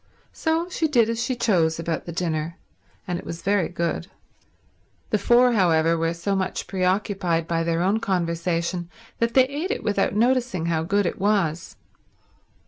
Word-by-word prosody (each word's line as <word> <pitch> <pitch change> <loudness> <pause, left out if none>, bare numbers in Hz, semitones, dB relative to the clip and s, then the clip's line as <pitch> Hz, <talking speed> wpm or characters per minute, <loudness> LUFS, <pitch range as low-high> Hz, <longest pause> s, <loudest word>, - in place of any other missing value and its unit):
So 325 +1 0
she 330 -3 -1
did 235 -6 +3
as 230 0 -2
she 255 +2 -1
chose 170 -9 +2
about 165 -1 -3
the - - -4
dinner, 165 -1 -2 0.5
and 175 -1 -2
it - - -10
was 165 - -7
very 200 -3 +1
good. 170 -1 -2 1.0
The 215 - +2
four, 245 +4 +5
however, 165 -5 +3
were 165 0 -1
so 195 +4 -1
much 190 -1 -2
preoccupied 185 -3 0
by 165 0 0
their 165 +1 0
own 200 +4 +2
conversation 170 -2 -1 0.3
that 230 0 0
they 260 -1 +7
ate 290 +7 -4
it 450 - -3
without 205 -1 0
noticing 240 -6 +1
how 165 -2 0
good 200 +4 +1
it - - -2
was. 185 -5 0
185 Hz, 165 wpm, -24 LUFS, 170-225 Hz, 1.0 s, they